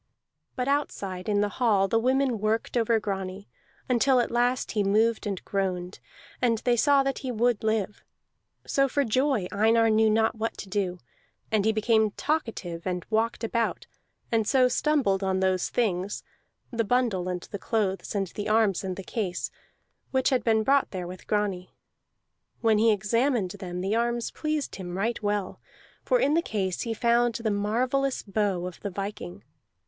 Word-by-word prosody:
But 250 -1 -2
outside 200 -10 -2
in 205 -1 +2
the 205 - +2
hall 205 -6 +3
the 225 +3 +2
women 260 -1 +1
worked 215 +3 -1
over 230 -1 +3
Grani 195 -1 -4 0.4
until 255 +1 +3
at 240 - 0
last 245 +2 +1
he 210 -2 +1
moved 220 +3 +2
and 195 -3 -4
groaned, 185 -2 -2 0.4
and 235 -2 +3
they 245 -1 +4
saw 280 +3 +4
that 270 -1 -2
he 260 - -4
would 235 -1 +1
live. 215 -2 -1 0.6
So 275 0 +2
for 285 +2 +1
joy 255 -3 +1
Einar 225 +2 +3
knew 220 0 +4
not 220 +1 +2
what 225 0 -3
to - - -7
do; 190 -2 -1 0.5
and 215 -2 +2
he 220 - +4
became 220 0 +2
talkative, 220 - -2
and 180 -1 -2
walked 225 +2 0
about, 230 0 -1 0.5
and 225 -2 +1
so 260 0 +4
stumbled 250 -9 +1
on 190 -1 +1
those 185 -1 +1
things 200 -4 -1 0.5
(the 230 -2 0
bundle, 220 -6 +1
and 180 -1 -3
the 200 - -4
clothes, 205 -2 -1
and 195 -1 +1
the 205 +4 -5
arms, 215 -4 +2
and 185 -1 -3
the 195 - -7
case) 185 -3 -3 0.6
which 260 -1 +2
had 255 - +2
been 220 -1 +3
brought 275 +3 +3
there 185 -2 -5
with 180 +1 -9
Grani. 200 -4 -1 0.9
When 220 -2 +3
he 225 +1 +5
examined 215 0 +1
them 180 -2 -6
the 195 +4 0
arms 235 0 0
pleased 305 -2 -3
him 180 -1 -6
right 230 +5 -1
well, 205 -2 -2 0.4
for - - +2
in 290 - +2
the 335 - +3
case 195 - -2
he 230 -1 -2
found 235 0 +2
the 225 -1 -1
marvellous 250 +7 0
bow 195 -3 -1
of 180 -1 -7
the 200 - -4
viking. 185 - -6
220 Hz, 175 wpm, -27 LUFS, 195-240 Hz, 0.9 s, he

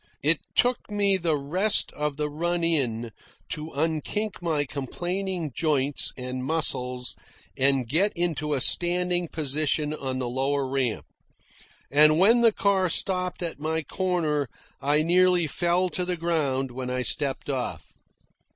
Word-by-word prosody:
It - - +4 0.2
took 245 -2 +1
me 200 -1 +3
the 165 -4 +1
rest 180 +10 +1
of 150 -1 -3
the 150 0 -1
run 170 +3 -2
in 120 -9 +1 0.4
to 150 +1 -5
unkink 165 +7 -2
my 155 -4 0
complaining 175 +5 -4
joints 145 -3 0
and 125 0 -4
muscles 125 -5 -1 0.4
and 135 -2 +3
get 180 - +2
into 155 -4 0
a 135 - -1
standing 175 +2 +2
position 150 0 -1
on 135 -3 -4
the 130 -1 -2
lower 135 +2 -1
step. 125 -4 -1 0.9
And 155 +2 +5
when 225 +7 +5
the 230 -1 +6
car 195 -3 +1
stopped 180 +1 -1
at 165 -4 -3
my 160 +1 -2
corner 160 -5 -1 0.3
I 145 +2 +2
nearly 180 +1 +4
fell 175 +4 +1
to 180 - -1
the 180 0 -2
ground 145 -6 -1
when 125 +1 -5
I 125 0 -1
stepped 140 0 -1
off. 125 - -4
155 Hz, 140 wpm, -26 LUFS, 135-180 Hz, 0.9 s, the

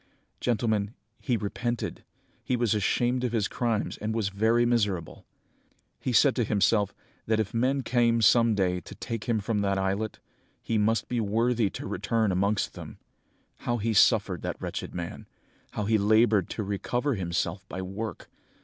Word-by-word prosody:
"Gentlemen, 110 -2 0 0.2
he 125 -4 0
repented, 115 +3 -3 0.4
he 125 - 0
was 120 -3 +1
ashamed 120 +4 +1
of 120 -2 -1
his 110 -3 +1
crimes 115 -4 -1
and 110 +1 -2
was 110 -4 0
very 110 +4 +2
miserable! 100 -9 -1 0.7
He 130 - -2
said 130 +3 +5
to 120 - +3
himself, 105 -1 +2 0.4
that 110 0 +2
if 105 -3 -2
men 130 +4 +1
came 115 -1 +2
some 115 +1 +5
day 90 -2 +1
to 85 - -11
take 115 -3 -5
him 115 -3 +1
from 105 +1 -1
that 100 -1 +1
islet, 100 +3 -1 0.4
he 115 -2 -1
must 110 +2 +1
be 120 - -1
worthy 115 +1 +1
to - - -7
return 110 -3 0
amongst 100 +3 0
them! - - -9 0.6
How 120 - -2
he 115 +1 -1
suffered, 100 - +4
that - - -4
wretched - - -5
man! 85 -1 -6 0.5
How 105 - -2
he 110 +1 +3
laboured 110 -2 +3
to 110 - -3
recover 120 +8 -1
himself 95 0 -2
by 95 - -5
work! 100 +1 -6
110 Hz, 165 wpm, -27 LUFS, 100-120 Hz, 0.7 s, said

